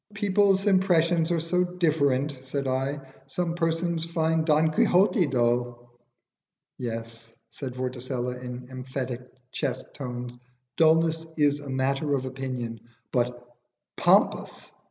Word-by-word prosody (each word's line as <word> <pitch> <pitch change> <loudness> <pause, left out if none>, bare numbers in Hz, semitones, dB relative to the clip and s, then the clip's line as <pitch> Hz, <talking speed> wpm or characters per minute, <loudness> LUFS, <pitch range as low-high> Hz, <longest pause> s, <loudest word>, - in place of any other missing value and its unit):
"People's 200 -1 +3
impressions 175 -4 +3
are 170 -1 +1
so 180 +3 +1
different," 150 -6 +1
said 135 +1 -3
I. 135 +2 -1 0.3
"Some 165 +5 -2
persons 165 0 0
find 160 -1 +1
'Don 155 0 +3
Quixote' 180 +2 +3
dull." 120 -1 0 0.9
"Yes," 115 -1 -6 0.2
said 130 +1 -6
Vorticella, 125 -1 -3
in 125 0 -7
emphatic 130 -1 -4 0.3
chest 140 -4 -3
tones, 125 -2 -6 0.4
"dulness 165 0 +3
is 145 -1 +3
a 145 -1 -9
matter 135 +2 0
of 130 -1 -2
opinion; 130 -3 -4 0.3
but 120 0 -1 0.5
pompous! - - +2
140 Hz, 115 wpm, -26 LUFS, 125-165 Hz, 0.9 s, People's